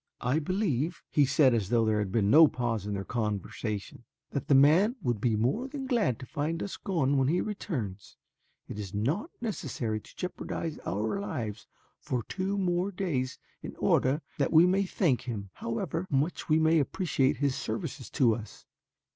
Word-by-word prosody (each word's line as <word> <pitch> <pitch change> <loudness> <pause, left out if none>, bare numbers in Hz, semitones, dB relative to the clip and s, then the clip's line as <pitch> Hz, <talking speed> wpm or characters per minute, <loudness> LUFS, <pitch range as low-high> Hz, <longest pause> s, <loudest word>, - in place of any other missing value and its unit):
"I 125 +5 +1
believe," 170 - -1
he 145 -3 +4
said 135 -1 +4
as 105 -5 0
though 115 -1 +3
there 110 -1 +2
had 100 -3 -2
been 105 -1 +2
no 160 +2 +9
pause 115 -6 -2
in 105 - -2
their 95 - -3
conversation, 105 -1 -3 0.3
"that 140 - -3
the 140 - +5
man 165 - +5
would 120 -5 0
be 115 -2 +2
more 130 - 0
than 275 -1 -5
glad 230 - +1
to - - -9
find 160 +4 -2
us 200 - -5
gone 145 -8 0
when 135 -1 +3
he 170 +5 +2
returns. 125 - -4 0.5
It 105 - -7
is 100 -1 -6
not 150 - -1
necessary 130 - -3
to - - -18
jeopardize 165 -3 -4
our 110 - -1
lives 110 - -4 0.3
for 125 -3 -2
two 195 - -2
more 180 0 0
days 160 -10 -2 0.2
in - - -7
order 140 +5 +2 0.2
that 140 - +1
we 165 +1 +7
may 190 +2 +2
thank 160 - +1
him, 105 -6 -5
however 160 +10 -3
much 145 +6 -1
we 155 - +5
may 160 +1 +4
appreciate 140 -3 +1
his 140 -2 +1
services - - -4
to 120 -4 +3
us. 110 0 -8
140 Hz, 180 wpm, -29 LUFS, 115-175 Hz, 0.5 s, no